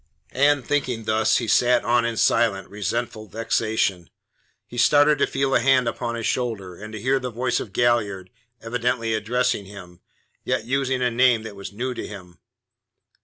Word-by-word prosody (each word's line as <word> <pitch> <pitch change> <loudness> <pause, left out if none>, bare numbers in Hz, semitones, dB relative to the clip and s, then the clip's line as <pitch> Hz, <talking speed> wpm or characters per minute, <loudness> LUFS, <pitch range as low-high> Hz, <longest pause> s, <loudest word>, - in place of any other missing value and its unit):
And 140 -1 +3
thinking 125 -5 -1
thus, 110 0 +2
he 115 - -2
sat 120 +2 +3
on 120 0 +2
in 115 -1 -2
silent, 100 -4 +2
resentful 110 +2 -3
vexation. 110 -4 -1 0.6
He 120 - -7
started 145 +3 +4
to - - +3
feel 135 0 -1
a - - +4
hand 130 0 +3
upon 115 0 -3
his 115 -1 -4
shoulder, 105 -8 -2
and 105 +4 -10
to 110 - -5
hear 130 +5 +1
the 130 -1 -4
voice 125 +2 -1
of 100 - -7
Galliard 105 -5 0 0.3
evidently 115 0 -1
addressing 120 0 0
him, 90 -3 -12 0.4
yet - - -1
using 130 0 0
a 125 - +1
name 120 -1 +3
that 110 -2 -8
was 100 +1 -8
new 125 +5 -3
to - - -6
him. 90 -5 -11
115 Hz, 170 wpm, -23 LUFS, 105-125 Hz, 0.6 s, started